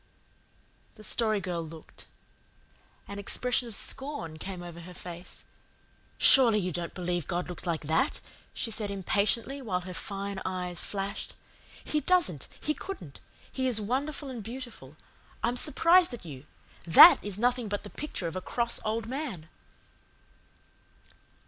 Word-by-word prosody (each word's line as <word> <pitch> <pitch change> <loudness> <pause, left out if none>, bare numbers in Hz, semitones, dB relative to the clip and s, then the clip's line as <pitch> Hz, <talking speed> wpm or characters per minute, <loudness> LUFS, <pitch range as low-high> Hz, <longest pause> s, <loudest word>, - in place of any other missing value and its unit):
The 215 - -14
Story 215 -1 +1
Girl 180 -3 -3
looked. 160 0 -12 1.0
An 200 0 -6
expression 245 +4 0
of 225 - 0
scorn 265 - -3
came 185 -1 -6
over 170 -1 -9
her 180 +1 -10
face. 175 0 -10 0.7
"Surely 240 -6 +7
you 185 -3 -1
don't 170 0 -4
believe 175 -3 -2
God 175 +1 -2
looks 180 0 -6
like 165 -2 -1
that," 160 +2 +1 0.3
she 230 - -3
said 210 -1 -3
impatiently, 210 +7 0
while 185 -7 -2
her 180 0 -8
fine 200 +1 -4
eyes 180 -1 -1
flashed. 200 0 -4 0.5
"He 305 - 0
doesn't 330 - +2
He 305 - 0
couldn't. 225 - -8 0.3
He 260 -1 -1
is 240 -4 +3
wonderful 275 +7 -2
and 240 -3 -6
beautiful. 225 - -9 0.5
I'm 235 +2 +1
surprised 335 +3 +4
at 220 - -14
you. 145 -2 -9 0.4
THAT 165 - +9
is 205 -2 -3
nothing 245 +1 +1
but 205 0 -3
the 205 - -10
picture 295 - -4
of 165 - -3
a 185 - -3
cross 235 +4 +1
old 220 0 -1
man." 235 - -5
200 Hz, 145 wpm, -29 LUFS, 175-245 Hz, 1.0 s, THAT